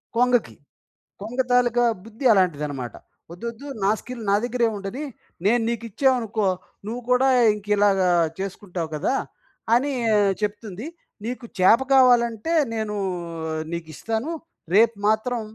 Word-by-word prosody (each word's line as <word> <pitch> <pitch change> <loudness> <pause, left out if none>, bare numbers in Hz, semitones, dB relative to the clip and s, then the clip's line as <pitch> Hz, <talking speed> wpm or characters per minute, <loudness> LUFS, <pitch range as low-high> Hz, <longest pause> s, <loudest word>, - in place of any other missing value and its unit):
కొంగకి. 245 -1 +2 0.7
కొంగ 230 +5 -6
తాలుక 245 -1 +3 0.2
బుద్ధి 225 +4 -9
అలాంటిదన్నమాట. 150 - 0 0.4
"ఒద్దోద్దు 235 +8 -7 0.2
నా 195 - +4
స్కిల్ 245 -2 -8
నా 200 - +5
దగ్గరే 245 -1 +1
ఉండని, 200 +9 -5 0.4
నేను 235 +4 +4
నీకిచ్చామనుకో, 230 -2 0 0.4
నువ్వు 235 +4 -4
కూడా 250 +2 +4 0.3
ఇంకిలాగ 205 -1 +2 0.4
చేసుకుంటావు 185 -3 -5
కదా!" 160 - 0 0.6
అని 275 +4 +1 0.5
చెప్తుంది. 210 - -4 0.4
"నీకు 245 +1 -5
చేప 190 +6 +6
కావాలంటే 245 +1 +4 0.2
నేనూ 215 -2 -3 0.8
నీకిస్తాను. 220 - -4 0.4
రేపు 230 +2 +5
మాత్రం 220 +3 +1
225 Hz, 105 wpm, -23 LUFS, 200-245 Hz, 0.8 s, చేప